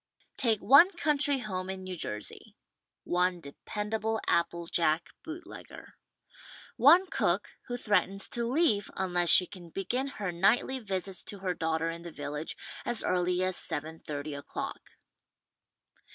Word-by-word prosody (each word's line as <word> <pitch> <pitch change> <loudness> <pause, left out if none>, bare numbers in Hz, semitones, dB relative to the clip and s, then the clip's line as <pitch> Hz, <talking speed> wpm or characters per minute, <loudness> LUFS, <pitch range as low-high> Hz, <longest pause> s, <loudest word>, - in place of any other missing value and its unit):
'' - - -39
Take 225 -4 +2
one 280 - +8
country 295 -4 +2
home 190 -6 -4
in 190 0 -5
New 185 0 -5
Jersey. 105 -10 -5 0.5
One 180 0 +1
dependa 210 +8 -5
ble 220 +1 0
apple 170 0 +1
jack 165 -1 +1
bootlegger. 330 +2 -10 0.8
One 330 +10 +7
cook 190 - 0 0.2
who 245 - -3
threatens 195 -3 +1
to 235 -1 -2
leave 255 - +2
unless 175 -2 0
she 180 - +8
can 180 -3 -11
begin 235 +10 -2
her 210 -9 -4
nightly 210 +9 +2
visits 195 -4 -1
to 205 - -3
her 185 -2 -1
daugh 160 -1 -1
ter 165 +1 -1
in 170 0 -8
the 170 - -8
village 150 +1 -5 0.3
as 240 -2 0
early 180 0 +1
as 185 -1 0
seven 160 +2 -2
thirty 145 0 -5
o'clock. 140 0 -6
185 Hz, 150 wpm, -30 LUFS, 170-230 Hz, 0.8 s, one